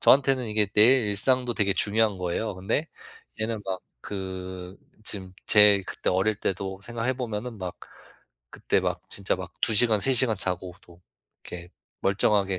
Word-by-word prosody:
저한테는 135 -2 +4
이게 105 -1 +3
내 105 +2 +4 0.3
일상도 125 +4 +2
되게 100 -2 +1
중요한 105 +1 +1
거예요. 90 +3 -2
근데 100 - -2 0.5
얘는 110 -1 -2
막 95 -1 -3 0.2
그 95 -1 -6 0.3
지금 95 -3 -4
제 105 -2 +6
그때 - - -2
어릴 95 +3 +1
때도 95 -1 -3
생각해 120 +3 -2
보면은 120 -2 -5
막 90 -2 -5 0.7
그때 - - 0
막 - - -2
진짜 100 -1 0
막 90 -1 -8
2 110 - +2
시간, 110 -1 +4
3 135 - +2
시간 120 -4 +2
자고 90 -1 -3
또 85 0 -18 0.4
이렇게 85 0 -8 0.3
멀쩡하게 100 -1 +2
100 Hz, 285 characters per minute, -26 LUFS, 95-115 Hz, 0.7 s, 제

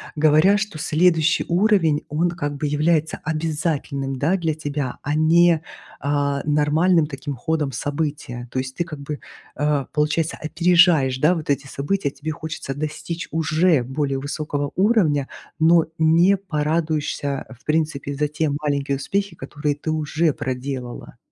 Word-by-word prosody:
говоря, 155 +6 +5
что 205 -6 -4
следующий 165 +2 +2
уровень, 175 -5 +3
он 160 +4 +1
как 145 -4 -3
бы 150 - -1
является 155 +2 +1
обязательным, 155 -4 -2
да, 165 +8 +2
для 165 -3 -1
тебя, 145 -4 -4
а 145 +1 -2
не, 165 +1 +4 0.4
а, 140 -1 0
нормальным 150 +3 +3
таким 145 0 -5
ходом 150 +2 -1
события. 140 -2 -3
То 130 - -1
есть 130 0 -5
ты 175 - 0
как 155 -3 -8
бы, 145 +1 -5 0.4
а, 145 -1 0
получается, 150 +2 0
опережаешь, 165 -5 +4
да, 150 +6 +4
вот 160 -4 -5
эти 140 0 0
события, 140 +4 -2
тебе 145 +3 -7
хочется 155 -3 -5
достичь 155 +3 -4
уже 160 -1 +2
более 135 +1 -2
высокого 145 0 -3
уровня, 185 - +2 0.3
но 165 0 +5
не 170 +5 +4
порадуешься, 155 -5 -1
а, - - -11
в 135 - -28
принципе 150 -2 -1
за 150 +2 0
те 150 +1 -1
маленькие 140 -2 -1
успехи, 195 +6 -2
которые 145 +1 -3
ты 145 +2 -6
уже 155 0 0
проделала. 130 -1 -5
150 Hz, 145 wpm, -22 LUFS, 140-165 Hz, 0.4 s, говоря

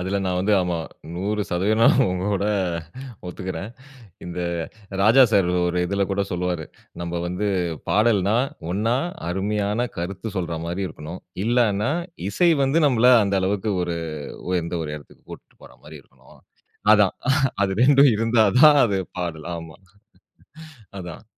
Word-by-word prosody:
அதில 95 +2 -2
நான் 90 -1 -1
வந்து 100 +4 +1
ஆமா, 90 -1 -1 0.4
100% 100 +1 -1
நா 115 - +6 0.3
உங்களோட 95 +2 -1 0.8
ஒத்துக்கிறேன். 90 +1 -5 0.6
இந்த 90 0 -6 0.6
ராஜா 115 +6 +7
சார் 100 -4 +3 0.2
ஒரு 90 0 -1
இதில 100 +2 0
கூட 100 +1 0
சொல்லுவாரு. 90 -2 -2 0.4
நம்ம 85 0 -3
வந்து 90 +4 -2 0.4
பாடல்ன்னா 105 -1 +2 0.4
ஒண்ணா 110 +6 0 0.3
அருமையான 105 +5 -1
கருத்து 95 +6 -4
சொல்றா 85 -2 -3
மாரி 90 +3 -3
இருக்கணும். 80 +2 -9 0.2
இல்லான்னா 115 -1 +2 0.4
இசை 170 - +3
வந்து 135 +5 +2
நம்மள 125 -2 +4
அந்த 100 -1 0
அளவுக்கு 100 +3 -1
ஒரு 85 -1 -3 0.5
உயர்ந்த 85 -1 -1
ஒரு 75 - -5
இடத்துக்கு 75 - -18
கூட்டிட்டு - - -14
போற - - -14
மாரி 75 0 -10
இருக்கணும். - - -21 0.6
அதான் 105 -3 +3 0.5
அது 95 - 0
2டும் 140 0 +6
இருந்தா 115 0 +3 0.2
தான் 150 -2 +8
அது 100 -4 0 0.2
பாடல். 85 -3 -4
ஆமா. 80 -1 -10 1.2
அதான். 90 +3 -9
95 Hz, 130 wpm, -23 LUFS, 90-110 Hz, 1.2 s, தான்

